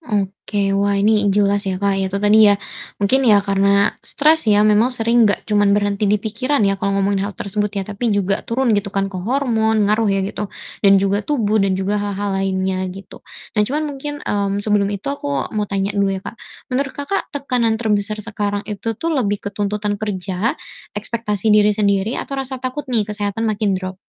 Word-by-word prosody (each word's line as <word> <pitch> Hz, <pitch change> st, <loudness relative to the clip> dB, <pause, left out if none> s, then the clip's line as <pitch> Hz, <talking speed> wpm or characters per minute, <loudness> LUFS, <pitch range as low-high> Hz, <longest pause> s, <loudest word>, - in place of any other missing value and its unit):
Oke, 200 Hz, -, -2 dB
wah 200 Hz, 0 st, +1 dB
ini 210 Hz, 0 st, +3 dB
jelas 200 Hz, 0 st, +1 dB
ya, 185 Hz, -, -1 dB
Kak, 200 Hz, +1 st, +1 dB
ya 190 Hz, -, 0 dB
itu 195 Hz, -, -3 dB
tadi 210 Hz, +1 st, +5 dB
ya 205 Hz, -, +4 dB, 0.4 s
mungkin 205 Hz, +7 st, +2 dB
ya 225 Hz, -6 st, +5 dB
karena 200 Hz, +1 st, +3 dB
stres 310 Hz, -3 st, +2 dB
ya 210 Hz, 0 st, +5 dB
memang 215 Hz, +3 st, +4 dB
sering 230 Hz, -2 st, +3 dB
enggak 205 Hz, -, -1 dB
cuman 205 Hz, -1 st, +3 dB
berhenti 205 Hz, 0 st, 0 dB
di 210 Hz, -, +4 dB
pikiran 225 Hz, +4 st, -1 dB
ya 195 Hz, -1 st, 0 dB
kalau 200 Hz, 0 st, 0 dB
ngomongin 195 Hz, 0 st, +1 dB
hal 205 Hz, -, -10 dB
tersebut 205 Hz, +1 st, -2 dB
ya, 195 Hz, -, -1 dB
tapi 210 Hz, +4 st, -3 dB
juga 200 Hz, -1 st, +1 dB
turun 240 Hz, 0 st, 0 dB
gitu 205 Hz, -1 st, 0 dB
kan 195 Hz, 0 st, -2 dB
ke 185 Hz, -, -4 dB
hormon 220 Hz, -2 st, +1 dB
ngaruh 215 Hz, +1 st, +2 dB
ya 195 Hz, -1 st, +1 dB
gitu, 205 Hz, +1 st, -4 dB, 0.3 s
dan 200 Hz, -1 st, +6 dB
juga 195 Hz, +1 st, +1 dB
tubuh 215 Hz, -4 st, 0 dB
dan 195 Hz, -1 st, +1 dB
juga 200 Hz, +2 st, -1 dB
hal-hal 205 Hz, 0 st, -2 dB
lainnya 190 Hz, -1 st, -1 dB
gitu. 195 Hz, +1 st, -11 dB, 0.3 s
Nah, 210 Hz, -, +1 dB
cuman 280 Hz, +9 st, 0 dB
mungkin, 290 Hz, 0 st, -5 dB
mmm, 200 Hz, 0 st, -1 dB
sebelum 205 Hz, -2 st, +2 dB
itu 200 Hz, -1 st, -5 dB
aku 140 Hz, -, -3 dB
mau 210 Hz, -1 st, -2 dB
tanya 195 Hz, 0 st, -1 dB
dulu 200 Hz, -1 st, +1 dB
ya, -, -, -6 dB
Kak, -, -, -7 dB, 0.4 s
menurut, 270 Hz, +1 st, -1 dB
Kakak, 285 Hz, +8 st, -2 dB
tekanan 250 Hz, -6 st, 0 dB
terbesar 215 Hz, -2 st, -1 dB
sekarang 205 Hz, -2 st, -3 dB
itu 215 Hz, +1 st, -4 dB
tuh 330 Hz, +6 st, -2 dB
lebih 210 Hz, -8 st, 0 dB
ke -, -, -1 dB
tuntutan 205 Hz, 0 st, -2 dB
kerja, 200 Hz, -, -2 dB, 0.4 s
ekspektasi 210 Hz, -1 st, 0 dB
diri 210 Hz, -1 st, +4 dB
sendiri 200 Hz, +2 st, +1 dB
atau 275 Hz, -1 st, -4 dB
rasa 265 Hz, 0 st, -4 dB
takut 260 Hz, +2 st, -5 dB
nih 230 Hz, -4 st, +1 dB
kesehatan 210 Hz, +1 st, -3 dB
makin 210 Hz, -2 st, 0 dB
drop? 185 Hz, 0 st, -5 dB
205 Hz, 195 wpm, -19 LUFS, 200-225 Hz, 0.4 s, dan